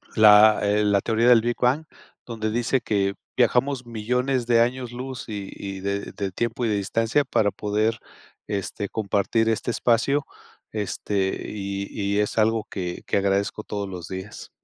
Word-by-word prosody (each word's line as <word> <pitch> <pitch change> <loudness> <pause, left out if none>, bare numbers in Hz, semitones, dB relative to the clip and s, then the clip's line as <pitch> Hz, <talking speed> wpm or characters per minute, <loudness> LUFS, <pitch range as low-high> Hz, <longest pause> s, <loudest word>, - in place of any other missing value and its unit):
la, 105 0 +7
eh, 105 +1 +2
La 100 -1 +3
teoría 115 +2 +1
del 120 -2 +7
Big 120 +1 -1
Bang, 130 +6 +2 0.4
donde 110 -2 -3
dice 120 +3 +1
que 100 -2 0 0.2
viajamos 130 0 +2
millones 125 +3 -1
de 115 -1 +5
años 125 0 -1
luz 130 +1 -6
y 100 -3 -6
y 95 -1 -6
de 100 +1 -3
de 100 -1 -4
tiempo 120 +5 -2
y - - +1
de 105 - +1
distancia 115 +7 +1
para 105 - +2
poder, 110 +3 -1 0.5
este, 100 0 -3
compartir, 110 +2 0
este 115 +2 -1
espacio, 120 +5 +1 0.5
este 100 -2 -2
y 100 -1 -4 0.3
y - - +3
es 105 +1 -1
algo 110 0 +2
que 90 -3 -4
que - - +1
agradezco 100 +2 0
todos 100 -2 -4
los 90 -2 -7
días. 95 +2 -8
110 Hz, 165 wpm, -24 LUFS, 100-120 Hz, 0.5 s, la